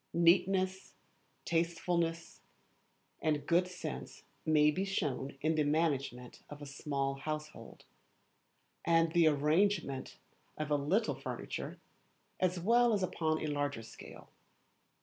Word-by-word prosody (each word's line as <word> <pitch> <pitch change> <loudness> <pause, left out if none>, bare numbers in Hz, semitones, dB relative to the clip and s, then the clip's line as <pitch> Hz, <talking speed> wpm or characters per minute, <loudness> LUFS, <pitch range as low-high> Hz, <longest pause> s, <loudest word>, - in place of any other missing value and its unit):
Neatness, 185 +2 +2 0.5
tastefulness, 170 0 -1 0.8
and 150 -2 0
good 175 +3 +3
sense 180 0 -7 0.2
may 150 -1 +5
be 185 +6 -1
shown 140 -8 -2
in 155 +2 +2
the 155 -1 +2
management 140 -5 -1
of 145 - -9
a 145 - -8
small 140 -1 -2
household, 155 +2 -6 1.0
and 165 -1 +3
the 170 -1 +5
arrangement 155 -1 +1 0.4
of 155 -1 -3
a - - +5
little 175 +11 +1
furniture, - - -5 0.6
as 180 -1 +1
well 235 +5 +4
as 200 -3 +1
upon 160 -3 0
a - - -4
larger 145 -5 -2
scale. 115 - -12
160 Hz, 115 wpm, -33 LUFS, 145-175 Hz, 1.0 s, may